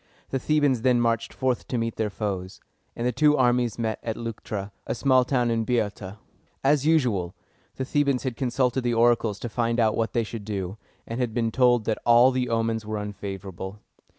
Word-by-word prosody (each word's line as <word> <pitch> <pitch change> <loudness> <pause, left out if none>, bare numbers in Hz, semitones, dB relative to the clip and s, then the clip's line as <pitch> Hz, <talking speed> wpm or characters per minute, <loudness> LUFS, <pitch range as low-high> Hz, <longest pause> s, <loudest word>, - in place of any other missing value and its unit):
The 135 - 0
Thebans 145 -4 +2
then 125 0 +3
marched 115 -1 0
forth 130 -2 -1
to 125 - -2
meet 115 -1 -2
their 110 -1 0
foes; 95 -3 -4 0.4
and 120 - -3
the 125 - +2
two 150 +4 +3
armies 120 -3 +2
met 110 -2 -2
at 115 -1 -3
Leuc´tra, 105 -3 -5 0.2
a - - -1
small 130 0 +4
town 125 -2 +1
in 115 -1 +1
Boeotia. 105 -4 -2 0.5
As 145 +1 +3
usual, 120 - +1 0.4
the 130 - -3
Thebans 140 -2 +1
had 130 -3 -2
consulted 130 0 0
the 120 -1 0
oracles 115 -3 +3
to - - -3
find 115 0 -1
out 110 -2 +3
what 115 0 -1
they 115 - +1
should 110 -1 -7
do, 100 -1 -4 0.3
and 115 +2 -5
had 120 -3 -1
been 115 -2 0
told 120 -2 +3
that 110 - -1
all 120 +2 +6
the 125 -1 -1
omens 115 -1 0
were 110 0 -4
unfavorable. 95 -1 -6
115 Hz, 195 wpm, -25 LUFS, 110-125 Hz, 0.5 s, all